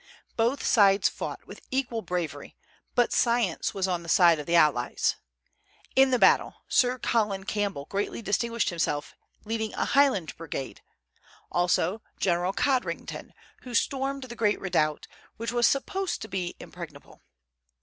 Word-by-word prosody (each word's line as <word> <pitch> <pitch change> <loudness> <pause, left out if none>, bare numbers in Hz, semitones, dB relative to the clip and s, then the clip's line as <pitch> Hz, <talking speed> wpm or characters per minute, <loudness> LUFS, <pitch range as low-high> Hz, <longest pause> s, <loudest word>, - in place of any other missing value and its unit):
Both 235 +5 0
sides 200 -2 +5
fought - - -6
with - - -11
equal 250 -4 -1
bravery, 165 -7 -4 0.4
but 245 -1 +3
science 235 -7 +1
was 190 -1 0
on 180 -2 -1
the 170 - -9
side 170 -3 +5
of 150 - -7
the 170 - +2
allies. 150 -7 +3 0.8
In 265 0 +6
the 255 - +3
battle, - - +4
Sir 250 0 +3
Colin 210 -6 0
Campbell 200 -8 -2
greatly 200 +5 -3
distinguished 230 +1 0
himself 150 -4 -2 0.3
leading 220 0 -3
a - - 0
Highland 270 - +2
brigade; 155 -4 -6 0.7
also 180 +4 +1 0.2
General 175 0 +1
Codrington, 260 +4 -2 0.3
who 245 -2 -7
stormed 275 +1 0
the 240 -2 -8
great 210 -3 +1
redoubt, 155 -5 0 0.3
which 230 +1 -3
was 240 -1 +3
supposed 380 +7 -1
to - - -7
be 185 -3 -3
impregnable. - - -11
205 Hz, 140 wpm, -27 LUFS, 175-240 Hz, 0.8 s, In